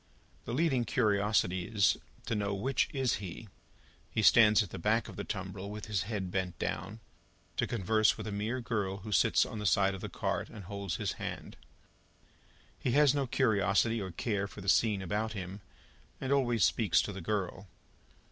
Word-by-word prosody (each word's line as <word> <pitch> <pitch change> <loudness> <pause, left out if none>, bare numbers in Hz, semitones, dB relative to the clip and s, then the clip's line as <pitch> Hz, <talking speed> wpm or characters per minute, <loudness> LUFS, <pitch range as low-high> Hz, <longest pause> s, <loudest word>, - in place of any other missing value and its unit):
The 115 - -4
leading 140 -5 +2
curiosity 100 -4 +1
is, 100 -5 +3 0.3
to 115 - -2
know 100 -2 -1
which 130 +7 0
is 135 -4 0
he; 95 +3 -8 0.6
he 110 - -1
stands 110 0 +7
at 95 - -10
the - - -6
back 110 +5 +1
of - - -9
the 100 - -4
tumbril 95 -1 -5
with 105 0 -6
his 105 -4 -1
head 95 -5 -3
bent 95 -2 -2
down, 110 +2 -4 0.6
to - - +1
converse 110 0 +2
with - - -6
a 105 - -4
mere 110 +5 -2
girl 105 -5 -2
who 105 - -5
sits - - +4
on 110 - -6
the 105 - -4
side 100 0 +3
of 95 - -7
the - - -5
cart, - - -2
and 105 - -10
holds 100 -2 -4
his - - -2
hand. - - -5 1.2
He 125 - -1
has 145 -2 +5
no 140 -2 0
curiosity 110 +1 +2
or 95 - -4
care 100 +3 -2
for 105 - -12
the 100 0 -2
scene 105 -3 +3
about 105 +4 -2
him, 95 0 -6 0.6
and 135 - -3
always 120 -8 +3
speaks 105 0 +2
to 100 - -5
the 95 - -7
girl. 100 +1 -3
105 Hz, 185 wpm, -31 LUFS, 95-115 Hz, 1.2 s, stands